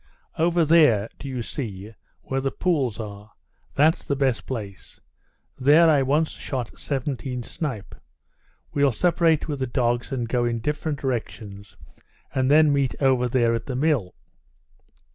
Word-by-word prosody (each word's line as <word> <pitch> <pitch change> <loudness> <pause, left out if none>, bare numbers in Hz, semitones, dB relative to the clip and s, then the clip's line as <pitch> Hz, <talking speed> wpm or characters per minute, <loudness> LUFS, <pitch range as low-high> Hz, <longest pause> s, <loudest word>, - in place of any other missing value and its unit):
Over 170 0 +3
there, 145 -10 +4
do 140 - -7
you 130 -3 -4
see, 105 -5 -6 0.3
where 135 0 -2
the 135 - 0
pools 135 - -1
are? 105 -1 -8 0.4
That's 155 +3 +3
the 140 - -1
best 135 -3 0
place. 105 -7 -7 0.6
There 150 +6 +6
I 150 -3 +4
once 150 +4 +1
shot 125 -5 -6
seventeen 130 -2 -3
snipe. 125 -7 -5 0.8
We'll 140 -3 +2
separate 165 +2 +2
with 145 -3 -3
the 130 - -1
dogs 120 -1 -1
and 125 -3 -2
go 120 +1 0
in 120 -1 0
different 150 +5 -2
directions, 110 -5 -5 0.6
and 130 0 +1
then 150 0 +5
meet 140 -2 0
over 130 -3 +2
there 120 -2 +2
at 115 - -3
the 130 - -3
mill." 130 - 0
130 Hz, 145 wpm, -24 LUFS, 115-150 Hz, 0.8 s, There